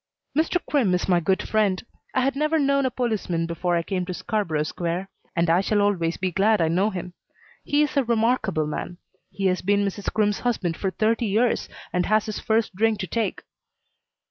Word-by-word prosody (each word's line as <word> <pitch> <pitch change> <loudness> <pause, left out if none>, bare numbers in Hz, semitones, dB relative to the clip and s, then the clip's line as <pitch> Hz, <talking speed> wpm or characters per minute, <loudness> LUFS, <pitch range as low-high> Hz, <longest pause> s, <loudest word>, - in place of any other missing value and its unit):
Mr. 320 +4 +2
Crimm 235 -11 +2
is 180 - -2
my 180 -2 +4
good 190 +3 0
friend. 210 -2 +1 0.3
I 260 - +3
had 270 +1 +1
never 305 +3 +1
known 275 -2 +2
a - - 0
policeman 215 -10 -1
before 175 +1 -1
I 170 - +1
came 185 0 -2
to 180 - -3
Scarborough 170 -10 -1
Square, 175 +4 -3 0.3
but 170 0 +2
I 170 +3 +4
shall 205 +1 +1
always 185 -5 +1
be 185 -1 -1
glad 210 +4 +3
I 165 -1 +2
know 185 +6 +2
him. 180 -3 -6 0.5
He 290 +1 +2
is 300 - -2
a 275 - +3
remarkable 225 -8 +1
man. 175 +3 -5 0.3
He 195 - -4
has 185 -1 +2
been 200 +1 +2
Mrs. 200 0 -3
Crimm's 210 -2 +1
husband 205 -9 -1
for 190 - -1
thirty 225 +4 +1
years 225 +4 +1 0.2
and 180 0 +1
has 215 0 +3
his 215 - -4
first 220 -1 0
drink 220 +2 +2
to - - -2
take. 225 +4 -2
205 Hz, 200 wpm, -24 LUFS, 180-230 Hz, 0.5 s, my